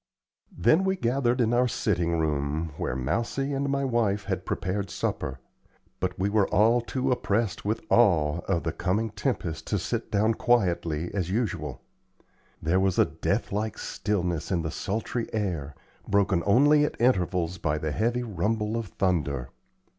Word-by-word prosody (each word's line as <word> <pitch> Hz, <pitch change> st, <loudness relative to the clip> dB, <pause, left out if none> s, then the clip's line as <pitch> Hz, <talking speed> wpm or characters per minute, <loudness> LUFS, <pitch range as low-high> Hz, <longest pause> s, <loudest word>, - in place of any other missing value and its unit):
Then 155 Hz, -, +4 dB
we 190 Hz, 0 st, +1 dB
gathered 125 Hz, -4 st, +1 dB
in 120 Hz, -1 st, +2 dB
our 125 Hz, +1 st, +4 dB
sitting 85 Hz, -7 st, 0 dB
room, 75 Hz, +1 st, -1 dB
where -, -, -2 dB
Mousie 115 Hz, -, -1 dB
and 140 Hz, +1 st, -1 dB
my 140 Hz, 0 st, 0 dB
wife 110 Hz, -5 st, +1 dB
had 95 Hz, -2 st, -3 dB
prepared 95 Hz, +2 st, -2 dB
supper; 65 Hz, -5 st, -3 dB, 0.6 s
but 90 Hz, 0 st, -2 dB
we 95 Hz, -, +1 dB
all 110 Hz, +3 st, +4 dB
were -, -, -3 dB
too 130 Hz, +2 st, -1 dB
oppressed 110 Hz, -4 st, 0 dB
with 110 Hz, +2 st, -1 dB
awe 85 Hz, -9 st, +4 dB
of 90 Hz, -4 st, 0 dB
the -, -, -1 dB
coming 110 Hz, +4 st, -1 dB
tempest 85 Hz, -, -3 dB
to 105 Hz, -, 0 dB
sit 115 Hz, +6 st, -3 dB
down 110 Hz, +1 st, +3 dB
quietly, 90 Hz, -, +1 dB
as 90 Hz, -4 st, -1 dB
usual. 110 Hz, +1 st, -2 dB, 0.8 s
There 85 Hz, +4 st, +1 dB
was 95 Hz, -1 st, +1 dB
a -, -, +6 dB
death -, -, -2 dB
like 105 Hz, +1 st, -2 dB
stillness 90 Hz, -5 st, -2 dB
in 85 Hz, -3 st, +1 dB
the 80 Hz, -, -3 dB
sultry 115 Hz, +3 st, -3 dB
air, 85 Hz, -9 st, -2 dB, 0.3 s
broken 100 Hz, -3 st, +2 dB
only 145 Hz, +7 st, +5 dB
at 150 Hz, -, -2 dB
intervals 90 Hz, -6 st, +1 dB
by 75 Hz, -1 st, 0 dB
the 80 Hz, 0 st, -2 dB
heavy 120 Hz, +7 st, 0 dB
rumble 110 Hz, 0 st, -1 dB
of 115 Hz, -2 st, -3 dB
thunder. 75 Hz, -9 st, -1 dB
100 Hz, 160 wpm, -27 LUFS, 85-115 Hz, 0.8 s, a